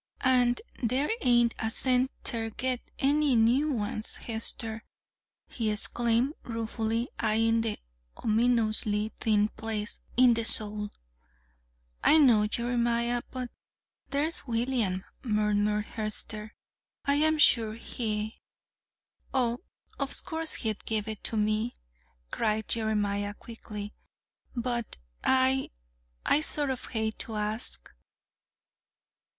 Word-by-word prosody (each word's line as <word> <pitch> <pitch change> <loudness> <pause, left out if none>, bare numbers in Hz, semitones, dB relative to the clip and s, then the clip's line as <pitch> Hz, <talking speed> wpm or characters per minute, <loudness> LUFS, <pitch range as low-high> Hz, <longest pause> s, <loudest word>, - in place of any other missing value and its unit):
"An' 250 -2 +4 0.3
there 260 - +1
ain't 240 - +4
a 220 - -1
cent 255 +2 +3
ter 225 -3 -2
get 255 +2 -2 0.2
any 285 -1 +3
new 245 +7 +3
ones, 215 -3 -2
Hester," 225 0 -2 0.6
he 225 -3 -2
exclaimed, 235 +5 +3
ruefully 225 0 -2
eying 225 +1 +2
the 225 -1 -2 0.4
ominously 220 -2 +1
thin 210 -1 +2
place 215 -2 -5 0.2
in 250 -1 +7
the 230 0 0
sole. 210 -1 0 1.1
"I 315 - +7
know, 235 -8 +5
Jeremiah, 235 +1 0
but 255 -2 -5 0.6
there's 290 +1 0
William," 230 -6 0 0.2
murmured 210 -2 +1
Hester. 215 0 -5 0.5
"I'm 305 +3 +3
sure 225 -7 +5
he 220 -2 -3 0.4
" - - -38
"Oh, 240 -2 +2 0.4
of 275 -1 +3
course, 320 -2 0
he'd 220 -3 -3
give 220 -1 -1
it 215 -2 -6
to 225 - -1
me," 215 +3 0 0.6
cried 220 -1 0
Jeremiah 205 -2 0
quickly; 210 -2 -8 0.6
"but 235 -1 -2 0.3
I 265 0 +3 0.6
I 300 - +4
sort 295 -3 +1
of 255 - -5
hate 220 -2 -3
to 225 - -3
ask." 210 +2 -3
230 Hz, 110 wpm, -29 LUFS, 215-250 Hz, 1.1 s, in